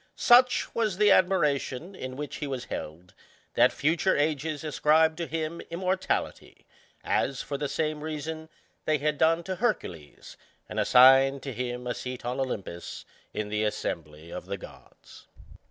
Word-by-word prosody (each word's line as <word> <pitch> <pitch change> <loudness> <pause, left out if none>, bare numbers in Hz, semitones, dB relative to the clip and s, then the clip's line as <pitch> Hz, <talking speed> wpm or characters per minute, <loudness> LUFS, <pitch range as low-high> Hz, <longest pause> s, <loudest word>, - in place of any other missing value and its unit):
Such 250 0 +4
was 215 -5 0
the 210 0 +5
admiration 170 -3 +1
in 130 -8 -7
which 145 +1 -6
he 150 - -4
was 130 -3 -4
held, 85 +4 -7 0.4
that - - +5
future 165 +6 +1
ages 150 0 -1
ascribed 155 +1 +3
to 170 -1 -3
him 160 +1 -3
immortality, 185 +2 -2 0.4
as, 135 -1 0
for 145 - -5
the 140 0 -2
same 155 +1 -2
reason, 155 +1 -5 0.4
they 155 -1 +2
had 150 0 -1
done 165 +1 +3
to 185 0 -4
Hercules, 90 - -3 0.3
and - - -4
assigned 135 +2 +6
to 135 - -5
him 125 +1 -4
a 120 - -1
seat 125 -1 -7
on 125 +2 -2
Olympus, 100 -9 -5 0.3
in 105 -1 -4
the 105 +1 -1
assembly 80 -6 -4
of - - -7
the - - -3
gods. - - -15
150 Hz, 155 wpm, -27 LUFS, 125-165 Hz, 0.4 s, assigned